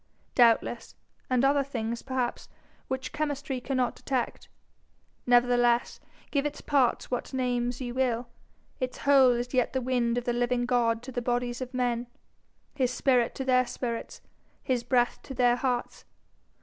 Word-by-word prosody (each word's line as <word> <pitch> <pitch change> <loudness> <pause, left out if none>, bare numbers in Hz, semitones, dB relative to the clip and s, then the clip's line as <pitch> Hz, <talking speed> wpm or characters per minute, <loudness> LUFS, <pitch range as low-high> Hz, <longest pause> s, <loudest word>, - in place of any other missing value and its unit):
Doubtless 235 -1 +2 0.3
and 255 0 +3
other 280 0 +3
things, 235 -4 -4
perhaps, 260 -2 -3 0.4
which 260 0 -4
chemistry 290 -3 -2
cannot 255 -2 0
detect. 260 -3 -3 0.8
Nevertheless, 245 0 +3 0.3
give 280 -2 +1
its 295 0 -3
parts 265 -5 +1
what 250 +2 -3
names 245 -1 -1
you 245 -1 -4
will, 245 -2 0 0.5
its 255 0 -3
whole 270 -3 +5
is 240 +2 -3
yet 255 -1 +1
the 260 - +1
wind 245 -2 0
of 245 - -1
the 240 - -1
living 245 0 0
God 235 -2 +1
to 260 - -7
the 245 - -3
bodies 245 +1 -1
of 255 -1 -5
men, 245 -1 0 0.7
his 260 -4 +1
spirit 250 -2 +2
to 265 - -4
their 255 -1 +3
spirits, 235 -2 -5 0.4
his 250 -2 0
breath 245 0 +1
to 270 - -9
their 245 -1 +3
hearts. 250 -1 -2
250 Hz, 150 wpm, -28 LUFS, 240-260 Hz, 0.8 s, whole